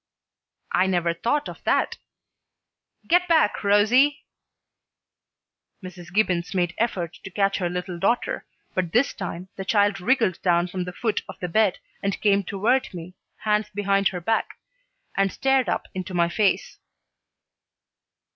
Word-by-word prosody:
"I 185 - +3
never 175 -2 +1
thought 285 - -1
of - - -10
that. - - +1 1.1
Get 355 +2 +3
back, 320 -13 +3
Rosie!" 240 +9 +4 1.6
Mrs. 180 -2 -10
Gibbons 180 -3 0
made 175 -1 +1
effort 180 -8 -2
to - - -7
catch 195 +1 +1
her 175 -2 0
little 180 0 -4
daughter, 235 +7 0 0.3
but 180 -3 -2
this 245 +4 +3
time 180 -1 -6
the 195 - -4
child 205 0 +2
wriggled 225 -4 +1
down 175 -1 +2
from 180 0 -3
the 180 - -5
foot 220 +3 -1
of - - -9
the 180 - -3
bed 200 +2 +2 0.2
and 200 -1 -2
came 200 -1 +3
toward 225 +8 0
me, 175 +1 -8 0.3
hands 210 0 +1
behind 200 -1 +1
her 180 - -3
back, 225 +6 -1 0.6
and 195 -1 +2
stared 265 -1 +1
up - - -1
into 185 0 -5
my 170 -1 +3
face. 200 +2 0
195 Hz, 145 wpm, -24 LUFS, 180-220 Hz, 1.6 s, Rosie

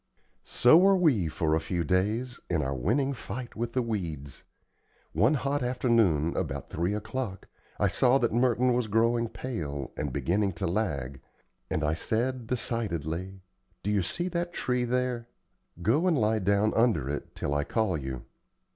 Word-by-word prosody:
So 125 +6 +6
were 195 +2 +6
we 145 - +3
for 80 0 0
a 80 - +3
few 85 +2 -2
days, 105 +8 0
in 80 -4 +1
our 70 0 -1
winning 125 - 0
fight 120 0 -7
with 115 +1 -3
the 130 - +1
weeds. 80 - -4 0.7
One 110 - +3
hot 140 +1 -1
afternoon, 115 - +2
about - - -3
three 85 +5 -1
o'clock, 110 -1 -4 0.3
I - - +3
saw 130 +1 +3
that 120 -4 0
Merton 125 +1 +3
was 120 -2 0
growing 115 +2 +2
pale, 75 - -5
and 75 -2 -3
beginning 95 +7 0
to 85 - -3
lag, 75 - -2 0.5
and 80 - -1
I 75 +1 +2
said, 120 +7 -1
decidedly: 95 - -3 0.4
"Do 105 - 0
you 105 -2 +2
see 175 - -2
that 175 0 -2
tree 125 -5 0
there? 125 -1 -1 0.6
Go 145 - +3
and 170 -4 +3
lie 110 -1 +2
down 100 +2 +2
under 115 - +2
it 75 +1 -5
till 70 - -2
I 75 0 +1
call 110 +1 0
you." 65 -4 -5
110 Hz, 165 wpm, -28 LUFS, 85-125 Hz, 0.7 s, So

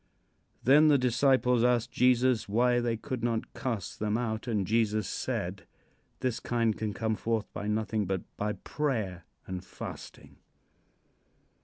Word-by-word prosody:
'" - - -43 0.2
Then 145 +5 +6
the 145 -2 +6
disciples 125 -1 +3
asked 120 -1 +2
Jesus 125 -2 +3
why 120 +3 +3
they 120 -1 0
could 125 0 -5
not 115 -2 -1
cast 115 -5 -4
them 105 +1 0
out, 110 -1 -3
and 105 -5 0
Jesus 110 -2 +1
said: - - -3 0.5
"This 125 -3 -1
kind 115 -3 0
can 110 -1 -2
come 110 +1 -1
forth 115 -1 -1
by 105 - -4
nothing 105 -1 0
but 95 -1 -1
by 105 +1 -1
prayer 110 - -3 0.2
and 95 -1 -5
fasting." - - -9
115 Hz, 145 wpm, -29 LUFS, 105-125 Hz, 0.5 s, Then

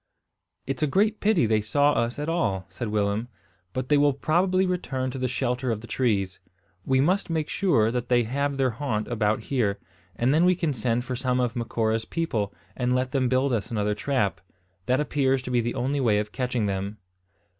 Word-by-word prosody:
"It's 135 -1 -3
a 155 - +3
great 210 +8 +2
pity 205 - +3
they 110 -1 +2
saw 145 +7 +3
us 115 +1 0
at 150 +1 -3
all," 100 - 0
said 120 - -5
Willem; 105 +2 0 0.4
"but 130 0 -4
they 145 -1 +5
will 145 -1 +4
probably 180 +7 +2
return 135 -8 -2
to 135 - -6
the 130 - 0
shelter 125 0 -1
of 110 -1 -3
the - - -9
trees. 100 -7 0 0.4
We 130 +3 +2
must 180 +9 +2
make 160 -2 -1
sure 135 - +2
that 125 0 -3
they 120 -1 +4
have 140 +4 -1
their 130 -2 +2
haunt 110 -3 -2
about 110 -2 +1
here; 110 -5 0 0.4
and 125 +4 +2
then 160 +3 +4
we 180 0 +5
can 165 -5 -1
send 120 0 -1
for 130 - -3
some 125 0 0
of 120 -3 0
Macora's 115 -1 -1
people, 115 -12 -2 0.2
and 125 0 0
let 130 0 0
them 130 -3 +1
build 130 +1 +2
us 105 -5 -1
another 105 -2 0
trap. 105 -7 -1 0.5
That 130 +2 +3
appears 135 -3 +1
to 125 - -5
be 120 -1 +3
the 120 +1 -3
only 140 +3 -1
way 115 -6 +3
of 105 0 -2
catching 125 -3 -1
them." 100 +1 -3
125 Hz, 205 wpm, -26 LUFS, 110-140 Hz, 0.5 s, they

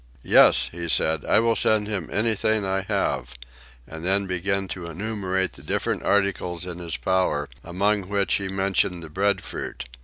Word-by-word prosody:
"Yes," - - +6
he 85 0 -5
said, 80 0 +2
"I - - +4
will 115 0 +2
send 110 -1 +3
him 100 -7 -4
anything 110 -1 +1
I 95 0 0
have;" - - -1 0.5
and 80 0 -9
then 95 +2 +1
began 95 +1 -1
to 90 -3 -6
enumerate 95 +1 -2
the - - -13
different - - -2
articles 95 -3 0
in 90 -1 -6
his 85 -3 -4
power, 90 -6 0 0.2
among 100 +2 0
which 100 -1 0
he 100 - 0
mentioned 95 -2 0
the 80 - -9
breadfruit. 100 -7 -2
95 Hz, 160 wpm, -24 LUFS, 85-100 Hz, 0.5 s, Yes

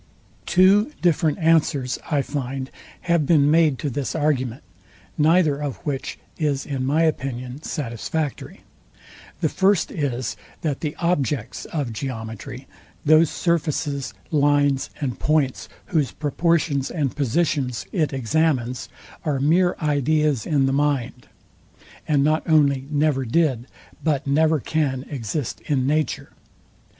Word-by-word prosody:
Two 195 +6 +5
different 160 -3 +2
answers, 155 -6 +2
I 145 -4 +1
find, 135 -2 -4 0.3
have 170 -5 +1
been 150 -3 +4
made 155 -4 +4
to 145 - -2
this 140 +4 -3
argument; 135 -5 0 0.5
neither 155 -1 +3
of 145 -3 -3
which 140 -3 -3 0.2
is 145 -3 0
in 130 -2 -2
my 155 +4 +3
opinion 130 -3 -2
satisfactory. 145 +1 -4 0.8
The 160 - +2
first 195 +4 +2
is, 130 - -2 0.3
that 150 -4 -1
the 150 -2 -3
objects 145 -8 -1
of 140 -8 -3
geometry, 125 +1 -6 0.4
those 155 +1 +6
surfaces, 150 -6 -1 0.2
lines 145 -2 +2
and 135 -5 -3
points, 150 -4 0 0.2
whose 150 -7 +1
proportions 150 -2 0
and 145 -6 -2
positions 140 -3 0
it 160 -6 0
examines, 130 -1 0 0.3
are 145 -4 0
mere 175 +6 +3
ideas 150 -2 +1
in 140 -4 +2
the 135 - +1
mind; 135 -3 -1 0.8
and 145 -2 +3
not 155 +2 +2
only 140 -4 +3
never 145 -2 +1
did, 130 -1 +1 0.4
but 150 -2 0
never 155 +2 +3
can 140 -3 -1
exist 130 0 -3
in 135 -4 +1
nature. 150 -1 -1
145 Hz, 120 wpm, -23 LUFS, 135-155 Hz, 0.8 s, those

